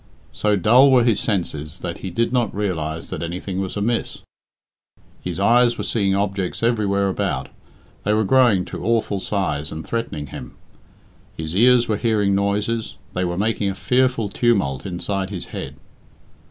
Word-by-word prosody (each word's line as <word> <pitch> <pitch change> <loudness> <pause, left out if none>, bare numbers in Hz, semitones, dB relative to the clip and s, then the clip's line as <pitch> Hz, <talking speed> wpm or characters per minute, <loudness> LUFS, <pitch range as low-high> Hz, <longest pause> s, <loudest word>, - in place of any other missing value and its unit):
So 105 -1 +1
dull 120 +8 +6
were 130 -2 +5
his 115 -3 +2
senses 85 -6 -2
that 85 -2 -5
he 95 - -5
did 115 +7 -1
not 120 -5 0
realise 80 -6 -3
that - - -4
anything 90 +3 -4
was 95 +1 -4
amiss. 115 +3 -2 1.0
His 90 0 -4
eyes 120 +4 +4
were - - -3
seeing 100 -4 +1
objects 100 0 -2
everywhere 100 -4 +2
about 95 - -2 0.5
they 105 - +1
were 110 +1 +3
growing 110 -5 +4
to - - -7
awful 110 -3 +1
size 75 -8 -2
and 80 0 -6
threatening 115 -8 -3
him. - - -8 0.8
His 80 +1 -4
ears 120 +3 +5
were 110 - 0
hearing 105 -3 +1
noises 105 +3 -1 0.2
they 90 - -1
were 85 -1 -2
making 105 0 0
a 95 - -3
fearful 125 -1 +1
tumult 100 - 0
inside 95 +1 -3
his 95 -4 -5
head. - - -5
100 Hz, 160 wpm, -21 LUFS, 90-115 Hz, 1.0 s, dull